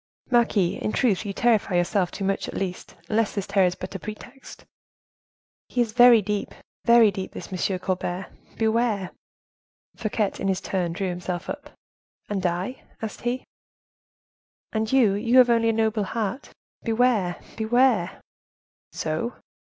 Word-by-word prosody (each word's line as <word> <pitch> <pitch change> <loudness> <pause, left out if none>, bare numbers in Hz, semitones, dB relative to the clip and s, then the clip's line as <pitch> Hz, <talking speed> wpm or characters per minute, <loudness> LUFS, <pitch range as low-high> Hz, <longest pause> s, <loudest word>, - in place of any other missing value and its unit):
—" - - -35
"Marquise, 220 -7 +2
in - - -1
truth 215 -5 +1
you - - -2
terrify 215 -3 +2
yourself 175 +1 +1
too 195 - -6
much 195 0 -1
at - - -7
least, 185 -2 -4
unless 220 +1 0
this 200 -2 -2
terror 195 -2 +3
is 180 - -2
but - - -7
a 195 - -5
pretext—" 240 +6 -10 1.0
"He 250 - -3
is 235 -2 +2
very 240 -1 +7
deep, 205 +1 -3 0.3
very 235 -2 +7
deep; 190 0 -6
this - - -8 0.2
M. 190 - -1
Colbert: 180 0 -3 0.3
beware!" 220 -4 +1 0.8
Fouquet, 215 -2 -1
in 195 - -2
his 190 -2 +1
turn, 180 -4 -2
drew 190 +2 -2
himself 180 0 -4
up. 295 +1 -9 0.6
"And 200 -3 -2
I?" 180 +9 -3 0.2
asked 220 -1 -6
he. 245 +2 -2 1.3
"And 220 0 -1
you, 245 -7 +4
you 230 +5 +2
have 250 -2 +7
only 230 -1 +3
a - - +4
noble 220 -1 +1
heart. 225 +6 -3 0.3
Beware! 225 -6 +1 0.2
beware!" 230 -4 +2 0.7
"So?" 160 +10 -3
215 Hz, 150 wpm, -25 LUFS, 190-235 Hz, 1.3 s, very